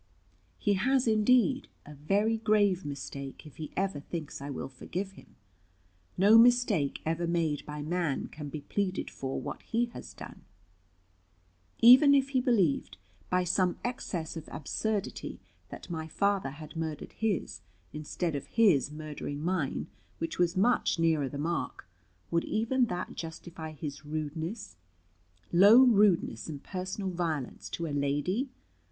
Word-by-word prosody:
"He 205 Hz, -, +1 dB
has, 255 Hz, +7 st, +2 dB
indeed, 250 Hz, +5 st, +3 dB, 0.2 s
a 150 Hz, -, -10 dB
very 200 Hz, +10 st, +1 dB
grave 205 Hz, -4 st, +3 dB
mistake, 140 Hz, -1 st, -6 dB
if 150 Hz, -, -13 dB
he 155 Hz, -2 st, -6 dB
ever 195 Hz, -5 st, 0 dB
thinks 155 Hz, -1 st, -6 dB
I 140 Hz, -, -6 dB
will 140 Hz, -, -4 dB
forgive 180 Hz, +9 st, -5 dB
him. 195 Hz, -, -17 dB, 0.8 s
No 205 Hz, +5 st, +7 dB
mistake 240 Hz, -, +3 dB
ever 165 Hz, +2 st, -1 dB
made 165 Hz, -4 st, 0 dB
by 150 Hz, 0 st, -5 dB
man 165 Hz, -3 st, -1 dB
can 150 Hz, -1 st, -7 dB
be 150 Hz, +1 st, -6 dB
pleaded 190 Hz, +5 st, -2 dB
for 135 Hz, 0 st, -4 dB
what -, -, -6 dB
he 235 Hz, +1 st, -1 dB
has -, -, -9 dB
done. -, -, -10 dB, 1.4 s
Even 265 Hz, +5 st, +9 dB
if 270 Hz, -1 st, +2 dB
he 260 Hz, -2 st, +2 dB
believed, 180 Hz, -, +1 dB, 0.3 s
by 180 Hz, 0 st, +2 dB
some 180 Hz, 0 st, +1 dB
excess 180 Hz, -10 st, -3 dB
of 160 Hz, -1 st, -8 dB
absurdity, 200 Hz, +8 st, -3 dB, 0.3 s
that -, -, -9 dB
my 160 Hz, -1 st, -4 dB
father 200 Hz, -1 st, 0 dB
had 150 Hz, +2 st, -10 dB
murdered 160 Hz, -2 st, -4 dB
his, 215 Hz, -6 st, -2 dB, 0.3 s
instead 155 Hz, +2 st, -3 dB
of 140 Hz, -, -5 dB
his 190 Hz, -, +4 dB
murdering 150 Hz, -1 st, -6 dB
mine 165 Hz, -3 st, -1 dB, 0.3 s
(which 165 Hz, +1 st, -4 dB
was 175 Hz, +1 st, +2 dB
much 235 Hz, +2 st, +3 dB
nearer 160 Hz, -4 st, +2 dB
the 140 Hz, -, -6 dB
mark), 160 Hz, -, -3 dB, 0.4 s
would 170 Hz, 0 st, +2 dB
even 240 Hz, +4 st, +1 dB
that 180 Hz, -3 st, -4 dB
justify 160 Hz, -1 st, -7 dB
his 150 Hz, -1 st, -7 dB
rudeness, 155 Hz, -, -5 dB, 0.8 s
low 205 Hz, +8 st, +8 dB
rudeness, 200 Hz, -, +3 dB
and 145 Hz, -2 st, -7 dB
personal 190 Hz, +1 st, -4 dB
violence 165 Hz, -6 st, -3 dB
to 170 Hz, -, -4 dB
a 150 Hz, -, -4 dB
lady? 145 Hz, -, 0 dB
170 Hz, 145 wpm, -30 LUFS, 150-210 Hz, 1.4 s, Even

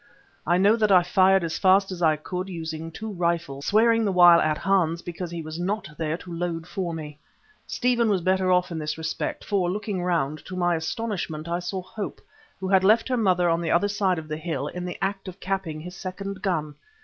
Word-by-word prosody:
I 175 Hz, -, +4 dB
know 200 Hz, +4 st, +5 dB
that 215 Hz, -2 st, +2 dB
I 180 Hz, -2 st, +7 dB
fired 190 Hz, +1 st, +4 dB
as 165 Hz, -1 st, -3 dB
fast 195 Hz, +1 st, +4 dB
as 180 Hz, -1 st, -6 dB
I 160 Hz, -2 st, +4 dB
could 180 Hz, +5 st, -5 dB
using 160 Hz, -2 st, -5 dB
two 220 Hz, +6 st, -6 dB
rifles, 170 Hz, -6 st, -2 dB
swearing 230 Hz, +2 st, +4 dB
the 205 Hz, -, +1 dB
while 175 Hz, -2 st, +7 dB
at 155 Hz, 0 st, +1 dB
Hans 175 Hz, -4 st, +1 dB
because 175 Hz, 0 st, -5 dB
he 170 Hz, -1 st, -5 dB
was 155 Hz, +2 st, -7 dB
not 200 Hz, +5 st, -2 dB
there 160 Hz, +1 st, -2 dB
to 175 Hz, -1 st, -10 dB
load 165 Hz, -1 st, -3 dB
for 180 Hz, -1 st, -3 dB
me. 150 Hz, -2 st, -7 dB, 0.5 s
Stephen 240 Hz, -2 st, +1 dB
was 195 Hz, -3 st, +1 dB
better 185 Hz, +1 st, +2 dB
off 180 Hz, 0 st, +2 dB
in 165 Hz, -, -3 dB
this 150 Hz, 0 st, -3 dB
respect, 160 Hz, 0 st, -4 dB
for, 190 Hz, -4 st, +1 dB
looking 205 Hz, -1 st, -3 dB
round, 155 Hz, -4 st, -1 dB
to 185 Hz, -, -7 dB
my 175 Hz, -1 st, +1 dB
astonishment 165 Hz, -2 st, -3 dB
I 170 Hz, +1 st, -1 dB
saw 185 Hz, +1 st, -4 dB
Hope, 200 Hz, +3 st, -6 dB, 0.4 s
who 190 Hz, -, -3 dB
had 190 Hz, 0 st, +4 dB
left 220 Hz, +5 st, +4 dB
her 255 Hz, -, +1 dB
mother 185 Hz, -6 st, +2 dB
on 165 Hz, 0 st, +1 dB
the 170 Hz, -, -2 dB
other 190 Hz, +4 st, +3 dB
side 200 Hz, -3 st, 0 dB
of 160 Hz, -1 st, -6 dB
the 155 Hz, 0 st, -4 dB
hill, 160 Hz, -3 st, -3 dB
in 180 Hz, 0 st, -6 dB
the 180 Hz, -, -5 dB
act 195 Hz, 0 st, -2 dB
of 185 Hz, +1 st, -8 dB
capping 190 Hz, -5 st, -3 dB
his 180 Hz, +2 st, -9 dB
second 190 Hz, +1 st, -6 dB
gun. 155 Hz, -7 st, -1 dB
180 Hz, 220 wpm, -25 LUFS, 165-195 Hz, 0.5 s, I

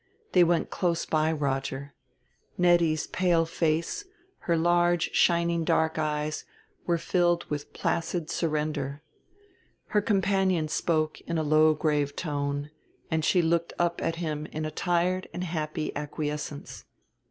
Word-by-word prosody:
They 180 Hz, -, +6 dB
went 170 Hz, 0 st, +1 dB
close 170 Hz, -2 st, 0 dB
by 155 Hz, 0 st, +1 dB
Roger: 140 Hz, -2 st, -2 dB, 0.6 s
Nettie's 170 Hz, -3 st, +3 dB
pale 170 Hz, -2 st, +2 dB
face, 165 Hz, -, -1 dB, 0.4 s
her 170 Hz, -1 st, 0 dB
large 175 Hz, +1 st, +2 dB
shining 170 Hz, -1 st, +3 dB
dark 160 Hz, 0 st, +1 dB
eyes, 150 Hz, 0 st, -1 dB, 0.4 s
were 170 Hz, -1 st, +3 dB
filled 175 Hz, 0 st, +1 dB
with 145 Hz, -1 st, -4 dB
placid 165 Hz, 0 st, -1 dB
surrender. 150 Hz, -3 st, -2 dB, 0.9 s
Her 210 Hz, -, +2 dB
companion 190 Hz, -5 st, +1 dB
spoke 155 Hz, -1 st, 0 dB
in 170 Hz, -, -1 dB
a 160 Hz, -, +1 dB
low 155 Hz, +1 st, +4 dB
grave 150 Hz, -2 st, 0 dB
tone, 145 Hz, -2 st, -2 dB, 0.4 s
and 160 Hz, -1 st, +1 dB
she 175 Hz, +2 st, +3 dB
looked 170 Hz, +1 st, +1 dB
up 170 Hz, 0 st, 0 dB
at 165 Hz, 0 st, -1 dB
him 155 Hz, -3 st, -3 dB
in 155 Hz, 0 st, -4 dB
a 155 Hz, -, -3 dB
tired 180 Hz, +3 st, 0 dB
and 180 Hz, -, -3 dB
happy 155 Hz, -3 st, -3 dB
acquiescence. 150 Hz, 0 st, -5 dB
160 Hz, 130 wpm, -27 LUFS, 150-175 Hz, 0.9 s, They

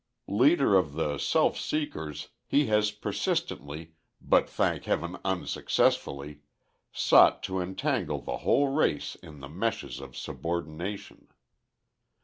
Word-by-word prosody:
Leader 135 Hz, -, +4 dB
of 80 Hz, -7 st, +2 dB
the 75 Hz, -2 st, -2 dB
self -, -, +2 dB
seekers, 80 Hz, -, -4 dB, 0.2 s
he 145 Hz, +1 st, +3 dB
has 105 Hz, -1 st, +2 dB
persistently, 80 Hz, -6 st, -3 dB, 0.3 s
but -, -, +2 dB
thank -, -, 0 dB
heaven 85 Hz, +2 st, -2 dB
unsuccessfully, 75 Hz, -5 st, 0 dB, 0.5 s
sought -, -, +5 dB
to 95 Hz, 0 st, -2 dB
entangle 95 Hz, +1 st, -1 dB
the -, -, -4 dB
whole 140 Hz, 0 st, +2 dB
race 135 Hz, -, 0 dB
in 75 Hz, -2 st, -13 dB
the 70 Hz, -, -7 dB
meshes 100 Hz, +10 st, -3 dB
of 70 Hz, -2 st, -10 dB
subordination. 85 Hz, +4 st, -5 dB
85 Hz, 115 wpm, -28 LUFS, 75-105 Hz, 0.5 s, sought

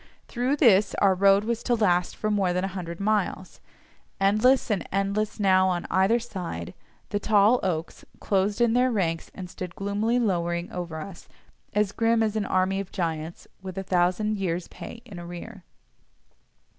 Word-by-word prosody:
Through 250 Hz, +3 st, 0 dB
this 210 Hz, -8 st, +4 dB
our 195 Hz, -1 st, +4 dB
road 195 Hz, +2 st, +4 dB
was 230 Hz, +1 st, -2 dB
to 245 Hz, -, +1 dB
last 180 Hz, -5 st, +1 dB
for 215 Hz, -, -2 dB
more 195 Hz, -4 st, +1 dB
than 180 Hz, +1 st, -1 dB
a -, -, 0 dB
hundred 170 Hz, -3 st, -6 dB
miles. 200 Hz, -2 st, -1 dB, 0.6 s
Endless, 215 Hz, +6 st, +3 dB
and 200 Hz, -, -2 dB
endless 200 Hz, +3 st, -1 dB
now 190 Hz, -2 st, +4 dB
on 175 Hz, -1 st, -2 dB
either 190 Hz, +6 st, +3 dB
side, 180 Hz, -, -6 dB, 0.4 s
the 205 Hz, -, -1 dB
tall 215 Hz, +3 st, +4 dB
oaks 165 Hz, -4 st, -3 dB, 0.2 s
closed 200 Hz, +3 st, 0 dB
in 235 Hz, -1 st, +4 dB
their 250 Hz, +1 st, +3 dB
ranks 165 Hz, -7 st, -1 dB
and 185 Hz, -, -7 dB
stood 180 Hz, 0 st, -8 dB
gloomily 205 Hz, +4 st, 0 dB
lowering 175 Hz, -6 st, -1 dB
over 170 Hz, -3 st, -5 dB
us, 190 Hz, +1 st, -10 dB, 0.4 s
as 210 Hz, -1 st, +1 dB
grim 230 Hz, +1 st, +2 dB
as 215 Hz, -1 st, -1 dB
an 215 Hz, -2 st, 0 dB
army 190 Hz, +1 st, +1 dB
of 195 Hz, -2 st, -6 dB
giants 165 Hz, -3 st, -4 dB
with 185 Hz, -1 st, -8 dB
a 195 Hz, -, -2 dB
thousand 185 Hz, +4 st, +1 dB
years' 175 Hz, -3 st, -2 dB
pay 235 Hz, -, -10 dB
in 185 Hz, -4 st, -9 dB
arrear. 175 Hz, +3 st, -9 dB
195 Hz, 170 wpm, -26 LUFS, 180-215 Hz, 0.6 s, this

